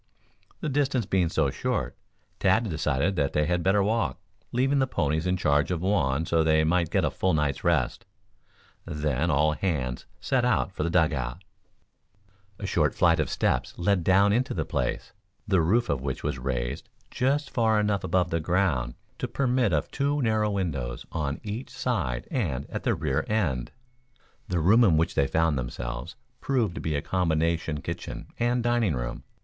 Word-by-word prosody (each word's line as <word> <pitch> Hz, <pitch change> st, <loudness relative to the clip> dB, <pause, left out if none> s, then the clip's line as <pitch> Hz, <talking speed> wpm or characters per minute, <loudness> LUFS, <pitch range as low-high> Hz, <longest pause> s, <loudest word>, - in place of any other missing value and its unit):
The -, -, -2 dB
distance 135 Hz, -4 st, +1 dB
being 95 Hz, -3 st, +1 dB
so 80 Hz, -5 st, +1 dB
short, 60 Hz, -, -2 dB, 0.4 s
Tad 100 Hz, +4 st, +3 dB
decided 80 Hz, +1 st, 0 dB
that 70 Hz, -2 st, 0 dB
they 75 Hz, 0 st, +2 dB
had 90 Hz, +1 st, 0 dB
better 95 Hz, +3 st, +3 dB
walk, 110 Hz, -1 st, 0 dB, 0.3 s
leaving 135 Hz, +3 st, +2 dB
the 130 Hz, -, +2 dB
ponies 80 Hz, -, 0 dB
in 90 Hz, 0 st, +1 dB
charge 75 Hz, -3 st, +2 dB
of 90 Hz, -2 st, -2 dB
Juan 80 Hz, -7 st, +1 dB
so 80 Hz, -1 st, +2 dB
they 80 Hz, 0 st, +3 dB
might 85 Hz, +1 st, +2 dB
get -, -, +1 dB
a -, -, 0 dB
full 95 Hz, -3 st, +1 dB
night's 75 Hz, -3 st, -1 dB
rest. 80 Hz, -8 st, +1 dB, 0.8 s
Then 75 Hz, +1 st, -1 dB
all 75 Hz, 0 st, +3 dB
hands 75 Hz, -7 st, -2 dB
set -, -, +1 dB
out -, -, +1 dB
for -, -, -5 dB
the 85 Hz, -, 0 dB
dug 85 Hz, -2 st, +3 dB
out. 65 Hz, +6 st, -4 dB, 1.1 s
A -, -, -6 dB
short -, -, +1 dB
flight 85 Hz, -2 st, +4 dB
of 75 Hz, -, 0 dB
steps -, -, -1 dB
led 90 Hz, 0 st, +1 dB
down 100 Hz, +3 st, +4 dB
into 125 Hz, +4 st, 0 dB
the 80 Hz, -4 st, -1 dB
place, -, -, -2 dB, 0.3 s
the 95 Hz, -3 st, +3 dB
roof 115 Hz, +9 st, +2 dB
of 70 Hz, -2 st, -1 dB
which 65 Hz, -1 st, -4 dB
was 65 Hz, -, -2 dB
raised 60 Hz, -2 st, -3 dB, 0.2 s
just 140 Hz, +3 st, 0 dB
far 110 Hz, -2 st, +2 dB
enough 105 Hz, -1 st, 0 dB
above 90 Hz, -2 st, +1 dB
the 85 Hz, -, +1 dB
ground 80 Hz, -8 st, 0 dB, 0.2 s
to -, -, -2 dB
permit 125 Hz, -5 st, +1 dB
of 75 Hz, -3 st, 0 dB
two 145 Hz, +1 st, 0 dB
narrow 110 Hz, -2 st, +2 dB
windows 75 Hz, -12 st, -3 dB
on 70 Hz, -3 st, -2 dB
each 110 Hz, +5 st, -5 dB
side 80 Hz, -, -2 dB
and 75 Hz, -, -2 dB
at -, -, -3 dB
the -, -, +1 dB
rear -, -, -1 dB
end. 75 Hz, -, -1 dB, 0.8 s
The 90 Hz, -2 st, 0 dB
room 105 Hz, +9 st, +5 dB
in 85 Hz, -8 st, +4 dB
which 80 Hz, -, +1 dB
they 70 Hz, -, +2 dB
found 80 Hz, -3 st, +1 dB
themselves, -, -, -5 dB, 0.2 s
proved 120 Hz, -9 st, 0 dB
to -, -, -6 dB
be 80 Hz, -2 st, -1 dB
a 70 Hz, -, -2 dB
combination 80 Hz, -3 st, 0 dB
kitchen -, -, -6 dB
and 120 Hz, 0 st, +1 dB
dining 120 Hz, -, +2 dB
room. -, -, -5 dB
85 Hz, 180 wpm, -27 LUFS, 75-105 Hz, 1.1 s, room